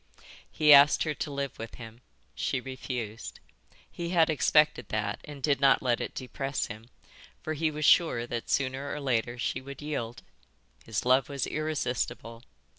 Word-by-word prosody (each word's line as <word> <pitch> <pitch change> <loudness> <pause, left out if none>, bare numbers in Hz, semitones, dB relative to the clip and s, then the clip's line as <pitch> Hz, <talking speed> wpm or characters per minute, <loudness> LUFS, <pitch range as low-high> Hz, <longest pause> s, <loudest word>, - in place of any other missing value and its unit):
He 150 -1 +6
asked 140 +1 +7
her 155 - -1
to 150 - -5
live 140 -1 -4
with 115 0 -7
him. 115 0 -11 0.3
She 135 - -1
refused. 125 -4 -6 0.5
He 170 -1 -5
had 165 -3 +3
expected 150 -4 +3
that 110 0 -2
and 145 -3 -10
did 140 -2 +1
not 135 -1 +4
let 120 -2 +1
it - - -5
depress 135 +1 -3
him, 110 +3 -10 0.5
for 155 - -2
he 155 +1 0
was 150 0 -3
sure 155 -10 +4
that 120 -1 -5
sooner 135 +1 -1
or 150 - -4
later 120 -3 -1
she 120 - -2
would 140 +1 -10
yield. 120 -6 -4 0.6
His 110 0 -3
love 130 +1 +3
was 140 -2 -2
irresistible. 125 -6 -3
135 Hz, 165 wpm, -28 LUFS, 120-150 Hz, 0.6 s, asked